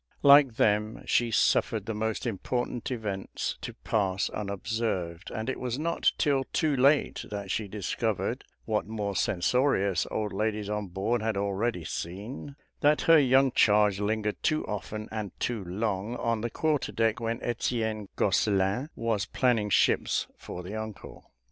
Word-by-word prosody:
Like 140 -4 +7
them, 105 0 +1
she 120 -1 +2
suffered 110 -1 +2
the 110 - -3
most 110 +3 -2
important 120 +2 -2
events 105 -6 -4
to - - -6
pass 100 -3 0
unobserved, 100 -4 -3
and 110 +1 -4
it 130 - -2
was 125 -1 -2
not 165 +3 +1
till 140 -4 +2
too 155 -3 0
late 140 +3 +3
that 100 -2 -5
she 110 - -1
discovered, 100 -1 -2 0.2
what 105 -2 -1
more 105 -2 -3
censorious 100 +1 +1
old 105 -1 -2
ladies 105 0 -1
on 105 -1 -2
board 100 +6 -1
had 110 -2 -1
already 100 -1 -1
seen, 100 - -6 0.2
that 150 0 +3
her 165 -1 +6
young 135 -1 +4
charge 105 -3 +4
lingered 105 0 -1
too 155 0 +1
often 105 +1 -5
and 105 -4 -5
too 115 -5 -2
long 100 +4 -2
on 115 -2 -1
the 120 - -2
quarter 155 +3 0
deck 115 0 +1
when 115 +1 -2
Etienne 110 -3 -2
Gosselin 100 - +1
was 115 -3 -1
planning 115 -5 +1
ships - - +2
for 90 - -8
the 95 +4 -7
uncle. 110 -2 -8
110 Hz, 150 wpm, -28 LUFS, 100-120 Hz, 0.2 s, Like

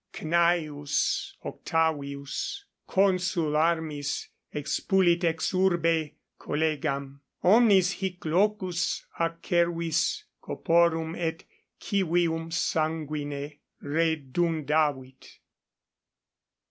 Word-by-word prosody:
Cn. 155 -3 0
Octavius 160 - -2 0.2
consul 185 -5 +1
armis 155 -3 0 0.2
expulit 175 +4 +1
ex 165 -1 0
urbe 165 -4 +2 0.3
collegam: 145 -3 -2 0.2
omnis 195 -2 +5
hic 180 -1 -5
locus 185 +1 0
acervis 165 - 0 0.2
corporum 165 -1 +1
et 165 -2 -3 0.4
civium 170 -4 0
sanguine 150 -3 -2 0.2
redundavit. 150 -3 -1
165 Hz, 60 wpm, -27 LUFS, 150-175 Hz, 0.4 s, omnis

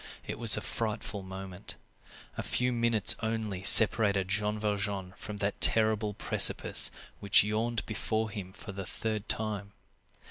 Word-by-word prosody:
It - - -8
was 115 -4 +7
a - - -5
frightful 110 -2 -6
moment. 95 0 -10 0.6
A - - -5
few 125 0 -2
minutes 115 -3 +2
only 110 -4 -5
separated 100 -2 +6
Jean 105 +1 -2
Valjean 100 -3 -5
from 105 -1 -10
that 100 0 -5
terrible 110 -2 +1
precipice - - +3 0.3
which 100 -1 +3
yawned 110 +2 -4
before 110 +1 -4
him 100 -3 -9
for 100 - -12
the 95 -1 -9
third 110 0 -6
time. 105 -2 -4
105 Hz, 140 wpm, -28 LUFS, 100-110 Hz, 0.6 s, was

